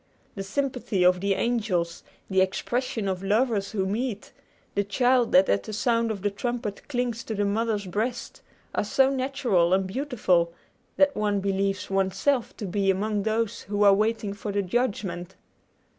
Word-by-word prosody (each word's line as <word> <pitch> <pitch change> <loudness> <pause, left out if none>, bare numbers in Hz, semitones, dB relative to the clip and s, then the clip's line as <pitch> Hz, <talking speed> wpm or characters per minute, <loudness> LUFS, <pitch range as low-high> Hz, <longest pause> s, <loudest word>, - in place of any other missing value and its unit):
The 195 - -5
sympathy 245 -2 -1
of 180 0 +5
the 200 0 +1
angels, 190 -9 -1 0.2
the 190 -1 +2
expression 220 +3 -1
of 185 -1 -2
lovers 210 0 +1
who 195 -3 -1
meet, 215 +1 -3 0.4
the 200 - +1
child 245 +4 +2
that 185 +1 +6
at 100 - +2
the 215 - -8
sound 230 +1 +1
of 200 -3 -4
the 205 - +1
trumpet 230 0 -4
clings 245 -4 -2
to 220 - -3
the 205 0 0
mother's 210 0 0
breast, 220 +7 -3 0.3
are - - 0
so 265 +6 +3
natural 255 -10 +2
and 190 0 0
beautiful 190 - +1 0.4
that 285 0 +4
one 205 -1 +1
believes 195 0 -1
one's 195 -1 0
self 270 0 0
to 210 - -5
be 195 +1 0
among 205 +2 +1
those 220 +1 -1
who 205 +1 -1
are 200 -1 +7
waiting 215 0 0
for 205 +1 -5
judgment. 190 -4 -2
205 Hz, 165 wpm, -26 LUFS, 195-235 Hz, 0.4 s, are